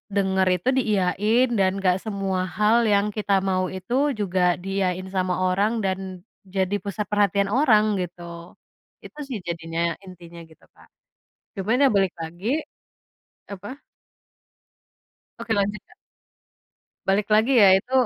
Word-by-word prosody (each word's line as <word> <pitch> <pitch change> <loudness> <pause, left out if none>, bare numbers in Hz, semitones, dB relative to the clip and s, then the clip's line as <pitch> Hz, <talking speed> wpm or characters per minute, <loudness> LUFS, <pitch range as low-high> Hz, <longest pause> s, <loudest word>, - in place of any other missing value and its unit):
denger 190 -1 +2
itu 180 +7 -7
diiyain, 215 +2 +2
dan 190 -1 +3
nggak 180 -1 +3
semua 195 -3 -2 0.2
hal 210 +2 +4
yang 205 +1 +2
kita 205 -2 -1
mau 185 -1 0
itu 185 +6 -6 0.3
juga 180 -3 +1
diiyain 190 -1 -2
sama 185 -1 0 0.2
orang 200 +4 +1
dan 190 0 -1 0.6
jadi 190 +1 +1
pusat 205 +1 -3
perhatian 200 -1 +2
orang, 215 -5 +3
gitu. 170 -1 -8 0.5
Itu, 300 - -13
sih, 240 -5 -4
jadinya, 165 0 -2
intinya, 175 -2 -12
gitu, 160 - -21
Kak. - - -20 0.7
Cuman, 220 +7 +1
ya, 275 - +7
balik 195 -3 +2
lagi, 175 +5 -7 1.0
apa 205 +8 -9 1.6
Oke, 225 - -3
lanjut, 205 +1 0
Kak. - - -22 1.1
Balik 200 +2 +2
lagi, 220 +5 +4
ya, 195 - +8
itu, 250 - -18
195 Hz, 130 wpm, -23 LUFS, 180-210 Hz, 1.6 s, ya